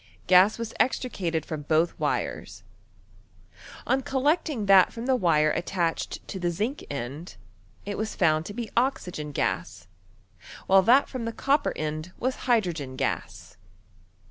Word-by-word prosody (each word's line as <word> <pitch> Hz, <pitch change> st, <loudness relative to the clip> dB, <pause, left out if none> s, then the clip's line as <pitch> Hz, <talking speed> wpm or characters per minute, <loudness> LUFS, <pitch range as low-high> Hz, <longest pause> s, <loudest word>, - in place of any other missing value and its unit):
Gas 185 Hz, +3 st, +5 dB
was 230 Hz, -1 st, -5 dB
extricated 175 Hz, -, -1 dB
from 155 Hz, -2 st, -5 dB
both 160 Hz, +3 st, +1 dB
wires. -, -, -3 dB, 1.2 s
On 270 Hz, -, +1 dB
collecting 275 Hz, -, 0 dB
that 195 Hz, -2 st, +6 dB
fiom 230 Hz, +1 st, -7 dB
the 260 Hz, 0 st, +3 dB
wire 155 Hz, -8 st, +3 dB
attached 175 Hz, -1 st, -2 dB
to 190 Hz, -, -6 dB
the 175 Hz, -1 st, 0 dB
zinc 215 Hz, -, -3 dB
end, 140 Hz, +5 st, -6 dB, 0.5 s
it 205 Hz, 0 st, -4 dB
was 220 Hz, 0 st, -4 dB
foimd 155 Hz, 0 st, +2 dB
to 205 Hz, -, -7 dB
be 235 Hz, -2 st, -5 dB
oxygen 180 Hz, -, -1 dB
gaSy 85 Hz, -10 st, -2 dB, 0.8 s
while 190 Hz, 0 st, +6 dB
that 245 Hz, +8 st, +5 dB
from 255 Hz, -3 st, -5 dB
the 230 Hz, -, -2 dB
copper 280 Hz, +5 st, +1 dB
end 155 Hz, +3 st, -4 dB
was 255 Hz, +1 st, -1 dB
hydrogen 170 Hz, -, 0 dB
gas. 90 Hz, -8 st, -4 dB
185 Hz, 140 wpm, -26 LUFS, 155-235 Hz, 1.2 s, that